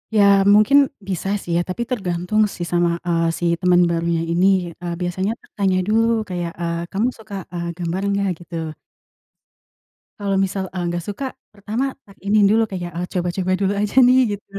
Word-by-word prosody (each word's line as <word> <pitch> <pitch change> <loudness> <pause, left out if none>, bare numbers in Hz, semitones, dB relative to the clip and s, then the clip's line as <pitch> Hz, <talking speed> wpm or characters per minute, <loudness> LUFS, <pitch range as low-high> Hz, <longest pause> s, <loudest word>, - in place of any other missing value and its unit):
Ya, 210 - +6 0.2
mungkin 215 +7 +6 0.3
bisa 190 -1 -3
sih 175 - -6
ya, - - +2
tapi 185 +6 -3
tergantung 190 -3 0
sih, 175 - -4
sama, 175 0 +2 0.2
eee, 165 -1 +2
si 175 - -2
temen 180 -1 +4
barunya 170 0 0
ini, 180 0 +2
eee, 175 -1 -4
biasanya 185 +3 -1 0.3
tanya 190 -2 +2
dulu, 225 +1 +2
kayak, 175 -2 -3
eee, 170 0 -2
"Kamu 205 +5 +1
suka, 220 -4 -11 0.2
eee, 170 -1 -4
gambar 175 +1 -2
nggak?" 200 0 0
gitu. 165 -2 -5 1.5
Kalau 200 -1 -1
misal, 190 0 -3
eee, 180 -1 -3
nggak 175 0 -3
suka, 205 +7 -4 0.3
pertama 210 +5 -3 0.2
tak 200 -1 -18
ini 205 +2 +3
dulu, 225 +2 +4
kayak, 175 -2 -4
eee, 175 +1 -3
coba-coba 180 +1 -1
dulu 195 0 +2
aja 210 +2 -2
nih, 255 +1 +5 0.2
gitu. 200 - -31
185 Hz, 175 wpm, -21 LUFS, 175-205 Hz, 1.5 s, Ya